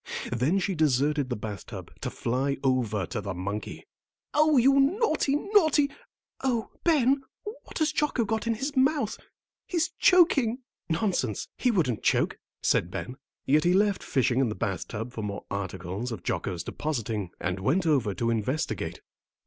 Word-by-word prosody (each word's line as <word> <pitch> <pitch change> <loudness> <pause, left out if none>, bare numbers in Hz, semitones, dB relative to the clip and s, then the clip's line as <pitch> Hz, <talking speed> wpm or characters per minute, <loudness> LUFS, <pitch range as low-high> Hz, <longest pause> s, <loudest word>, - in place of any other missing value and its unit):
Then 125 +10 +1
she 195 0 0
deserted 145 -2 +2
the 125 - -1
bath 105 -2 -6
tub, - - -8
to - - -2
fly 135 +4 -1
over 120 -7 +1
to 110 +1 -4
the 100 -2 -4
monkey. 100 - -5 0.5
"Oh, 305 -1 +4
you 270 +3 +5
naughty, 310 - +2
naughty 315 -6 +3 0.5
Oh, 240 -4 0
Ben, 275 -5 +3 0.4
what - - -9
has 315 -1 +2
Jocko 300 -6 +1
got 220 +2 -2
in 230 - +1
his 275 +6 -3
mouth? 265 -4 +2 0.5
He's 340 -4 0
choking!" 275 - +4 0.3
"Nonsense, 160 - -1
he 250 - +1
wouldn't 155 - +1
choke," - - +1 0.2
said 85 - +2
Ben; 125 +7 -5 0.3
yet 150 +3 +4
he 175 +1 +3
left 205 0 +2
fishing 130 -1 +1
in 130 -4 +2
the 105 - -4
bath 95 -2 -3
tub 115 +2 -5
for 110 - -5
more 105 -1 -5
articles 95 +3 -4
of 110 -6 -6
Jocko's 90 -4 -2
depositing 115 - -3
and 90 +2 -2
went 155 - +1
over 130 -11 +2
to 115 +5 0
investigate. 115 +7 -2
150 Hz, 160 wpm, -27 LUFS, -, 0.5 s, you